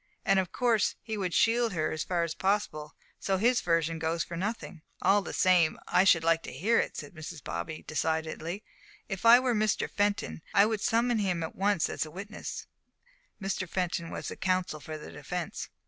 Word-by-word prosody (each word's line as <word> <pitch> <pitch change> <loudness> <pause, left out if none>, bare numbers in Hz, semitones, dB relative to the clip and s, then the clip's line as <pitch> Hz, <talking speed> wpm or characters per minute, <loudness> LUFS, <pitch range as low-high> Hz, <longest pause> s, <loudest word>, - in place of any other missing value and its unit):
And 195 0 +4
of 185 -2 -2
course 235 -4 +2
he 220 -1 -4
would 190 -4 -2
shield 230 +2 +3
her 155 -3 0
as 155 - -2
far 175 -2 0
as 165 -2 -2
possible, 190 -7 -1 0.2
so 195 -1 0
his 240 +5 +3
version 165 -1 +1
goes 165 +1 0
for 170 - -7
nothing." 190 -2 -4 0.2
"All 205 +1 +4
the - - -6
same, 180 -4 +3
I 185 - +4
should 170 -4 +5
like 165 0 +3
to - - -8
hear 205 - +2
it," - - -2
said - - -7
Mrs. 155 -1 -8
Bobby 85 - -5
decidedly. 160 - -2 0.4
"If 195 +3 -1
I 240 +2 +10
were 255 -1 +1
Mr. 215 -1 +1
Fenton, 205 - -1
I 200 - +7
should 215 -1 -1
summon 235 +1 +2
him 180 -5 0
at 160 - -5
once 200 -3 +2
as - - -2
witness." 200 +7 -7 0.7
(Mr. 190 -2 -3
Fenton 170 -2 -2
was - - -5
the - - -6
counsel 185 -4 0
for 155 +1 -7
the 150 - -10
defence.) 180 -2 -5
185 Hz, 195 wpm, -29 LUFS, 165-205 Hz, 0.7 s, I